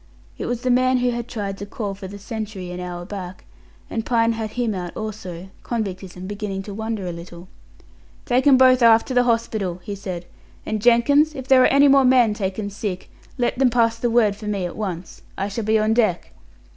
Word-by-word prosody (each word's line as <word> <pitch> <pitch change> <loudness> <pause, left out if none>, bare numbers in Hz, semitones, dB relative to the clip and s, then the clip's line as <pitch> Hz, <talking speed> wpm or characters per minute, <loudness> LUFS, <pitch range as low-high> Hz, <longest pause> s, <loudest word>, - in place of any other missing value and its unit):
It - - -5
was 245 -1 -2
the 255 0 +1
man 255 +1 +3
who 250 0 +1
had 240 0 -4
tried 200 -5 -5
to 200 - -5
call 200 -1 -4
for 195 -1 -8
the 200 +2 -9
sentry 205 -3 -6
an 180 - -6
hour 175 -1 -6
back, 185 -2 -8 0.4
and 225 - -3
Pine 230 -1 +2
had 220 -1 -4
him 240 -3 -1
out 180 -2 -6
also; 190 -4 -7
convictism 190 -5 -5
beginning 200 -1 -4
to 205 - -8
wonder 220 -1 -4
a 175 - -3
little. 170 +1 -10 0.8
"Take 255 +2 +2
'em 270 -2 +7
both 255 -1 +5
aft 230 -1 +6
to - - -2
the 245 0 +3
hospital," 220 -6 -1
he 205 - -5
said; 185 -3 -6 0.4
"and, 215 -1 -2
Jenkins, 285 +7 +4
if 265 -2 -7
there 265 -1 +6
are - - +6
any 280 +1 +5
more 275 0 +6
men 250 -4 +4
taken 200 0 -3
sick, 195 -3 -5 0.3
let 245 0 -1
them 265 -2 +5
pass 230 -1 +2
the 240 - 0
word 225 -3 +3
for 210 +1 -9
me 200 -3 -1
at 175 - -6
once. 185 -5 -5 0.2
I 195 - -1
shall 205 +2 -4
be 220 +1 +3
on 215 +1 +2
deck." 215 -7 +1
215 Hz, 215 wpm, -22 LUFS, 195-240 Hz, 0.8 s, em